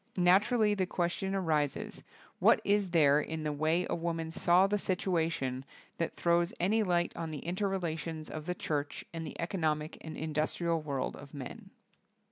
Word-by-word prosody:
Naturally 210 +5 +4
the 190 -3 0
question 190 +2 -1
arises, 155 -6 -1 0.4
what - - +6
is 200 -1 +2
there 150 -4 +5
in 160 +1 -4
the 150 -1 -1
way 160 +4 +1
a - - -2
woman 165 -1 -2
saw 175 +2 +4
the 205 +1 +1
situation 165 -9 -1 0.3
that 165 - -2
throws 170 0 +2
any 210 +6 +3
light 175 -4 +1
on 165 -1 -4
the 155 -2 -6
inter 185 +4 0
relations 165 -4 -3
of 155 +1 -7
the 180 - -1
church 145 -4 -3
and 165 -1 -4
the - - -9
economic 155 -3 -1
and 160 -1 -7
indus 155 0 -1
trial 170 -2 0
world 140 -4 -2
of 145 0 -11
men? 130 -3 -8
165 Hz, 170 wpm, -32 LUFS, 155-180 Hz, 0.4 s, what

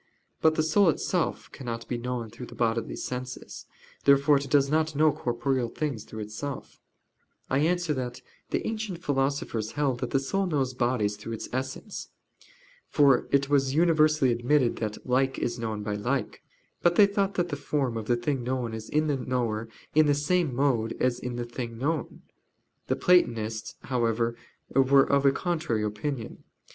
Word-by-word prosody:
But 160 0 +4
the 155 - +2
soul 175 +4 +4
itself 155 - -1
cannot 115 -3 -6
be 125 - -2
known 120 -2 -4
through 120 +2 -9
the - - -12
bodily 115 -1 0
senses. 125 0 -6 0.4
Therefore 140 +1 +5
it 140 0 -4
does 140 0 +4
not 155 +1 +1
know 155 +1 +5
corporeal 120 0 -1
things 135 -6 -3
through 110 - -7
itself. 110 +7 -6 0.7
I 135 - +3
answer 175 +1 +1
that, 125 -3 -5 0.3
The - - -1
ancient 215 -6 -4
philosophers 135 -6 -1
held 140 -4 0
that - - -3
the - - +2
soul 195 +9 0
knows 135 -6 0
bodies 120 -5 0
through 115 +2 -6
its 110 - -6
essence. 130 - -4 0.8
For 140 -4 +4
it 140 0 +2
was 135 -1 +2
universally 155 -4 +4
admitted 120 +2 +2
that 110 -2 -4
"like 130 +1 +2
is 120 0 -2
known 110 -2 -3
by 105 0 -2
like." 120 +3 -2 0.4
But 175 0 +3
they 205 - +8
thought 200 -1 0
that 175 -1 0
the 145 - -2
form 140 -4 -1
of 110 -1 -4
the 120 - +2
thing 130 +2 -1
known 125 -2 -2
is 110 0 -7
in 155 +1 +2
the 145 -3 0
knower 115 -4 -2 0.2
in 155 0 +5
the 145 - +4
same 150 -1 +1
mode 120 -5 +1
as 125 -1 +1
in 125 -1 -4
the 120 0 -3
thing 120 -1 -6
known. 150 +3 -2 0.6
The - - +1
Platonists 115 -11 +2
however 115 -2 0 0.4
were 135 +1 +5
of 140 0 +3
a - - +6
contrary 155 -8 -1
opinion. 110 +4 -4
130 Hz, 175 wpm, -27 LUFS, 120-150 Hz, 0.8 s, they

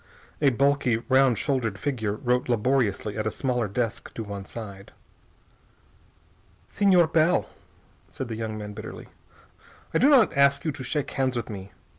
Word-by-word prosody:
A 145 - +5
bulky, 140 -1 +2
round 130 -3 +4
shouldered 125 -8 -1
figure 115 -7 -2
wrote 125 +2 -1
laboriously 115 -3 0
at 110 - -1
a - - +2
smaller 125 -2 -1
desk 115 +2 -3
to 115 - -4
one 100 -2 -7
side. 100 -4 -9 1.8
"Señor 180 -5 +4
Bell," 165 +2 +3 0.6
said 130 - -6
the 115 - -5
young 110 -1 -4
man 105 -1 -7
bitterly, 110 +1 -9 0.8
"I - - +3
do 270 - +5
not 255 - +5
ask 140 +1 +3
you 155 - +1
to 140 -2 -8
shake 145 +3 -2
hands 130 -1 0
with 120 -2 -3
me. 100 -1 -8
125 Hz, 155 wpm, -26 LUFS, 110-140 Hz, 1.8 s, A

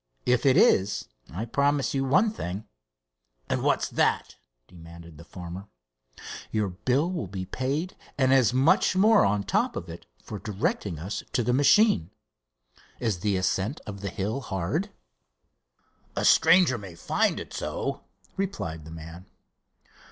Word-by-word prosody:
If 125 +2 +2
it 130 - +5
is, 100 +2 +3 0.2
I 95 +7 -4
promise 140 +3 +1
you 135 -1 0
one 190 - +3
thing." 100 - -5 0.8
"And - - -1
what's - - +1
that?" - - 0 0.3
demanded 85 -2 -13
the - - -10
farmer. 90 +3 -9 0.8
"Your 105 -2 -1
bill 125 - 0
will 170 - -3
be 95 0 -5
paid, 140 - -3 0.2
and 130 -1 +3
as 125 -5 +4
much 135 +7 +3
more 210 +3 +5
on 100 0 +1
top - - 0
of 85 - -6
it 85 +1 -10 0.2
for 105 - -7
directing 100 -3 -2
us 95 +7 -4
to 120 - +1
the 125 - +1
machine. 140 - +4 0.9
Is 110 -7 -1
the 100 +1 0
ascent 95 +8 -1
of 100 -2 -7
the 100 - -3
hill 105 +7 -3
hard?" 110 - -2 1.3
"A - - -1
stranger 165 -9 +5
might 95 -4 -10
find - - 0
it - - -9
so," - - -3 0.4
replied 100 - -4
the - - -10
man. 80 +2 -10
105 Hz, 145 wpm, -26 LUFS, 90-135 Hz, 1.3 s, it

